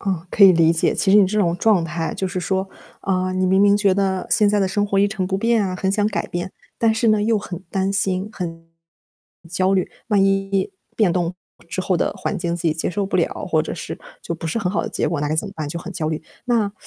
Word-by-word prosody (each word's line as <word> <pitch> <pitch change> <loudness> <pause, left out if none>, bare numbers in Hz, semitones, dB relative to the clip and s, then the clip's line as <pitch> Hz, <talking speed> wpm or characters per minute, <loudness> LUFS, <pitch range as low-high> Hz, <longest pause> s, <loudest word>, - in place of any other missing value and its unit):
嗯， 185 -4 -2
可 210 - +2
以 190 -2 +10
理 165 -1 +4
解。 165 - +1
其 190 - +1
实 205 - +8
你 200 - +6
这 210 +3 -1
种 175 -3 +2
状 195 -3 +3
态， 165 -1 -3
就 190 - -2
是 185 0 -3
说， 190 +1 -1 0.3
嗯， 185 -1 -1
你 185 - +2
明 190 +1 +3
明 205 0 +5
觉 200 -2 +3
得， 190 -1 0
现 210 -2 +4
在 210 - +2
的 195 - +2
生 205 +2 0
活 200 -1 0
一 200 - +4
成 200 -2 -2
不 190 +1 -1
变 230 -1 +2
啊， 185 -1 -3
很 190 +1 0
想 205 0 +2
改 - - -3
变， 175 +2 -4 0.3
但 225 -1 +3
是 225 +1 +1
呢， 215 -1 +3
又 220 0 +2
很 185 -3 -7
担 195 0 0
心、 195 0 0
很 165 -4 -6 0.8
焦 185 +3 +1
虑， 185 - +1 0.2
万 205 -3 +3
一 195 0 0 0.2
变 205 -6 +3
动 175 -1 0 0.4
之 180 +2 -3
后 185 -1 0
的 - - 0
环 - - -3
境 170 -1 -2
自 175 - -6
己 165 -2 +2
接 160 - -2
受 195 +3 -2
不 195 - -1
了， - - -1
或 - - +2
者 - - -5
是 - - -6 0.2
就 170 - -4
不 165 - -6
是 165 +8 -1
很 180 -4 -1
好 - - 0
的 - - -4
结 - - -1
果， 165 -3 -2
那 145 - -1
该 155 - -1
怎 185 - +1
么 195 - -8
办？ 155 -4 -4
就 170 - -4
很 190 - -8
焦 155 -4 -2
虑。 155 -1 -2 0.3
那， 225 -5 +1
190 Hz, 290 characters per minute, -21 LUFS, 175-205 Hz, 0.8 s, 以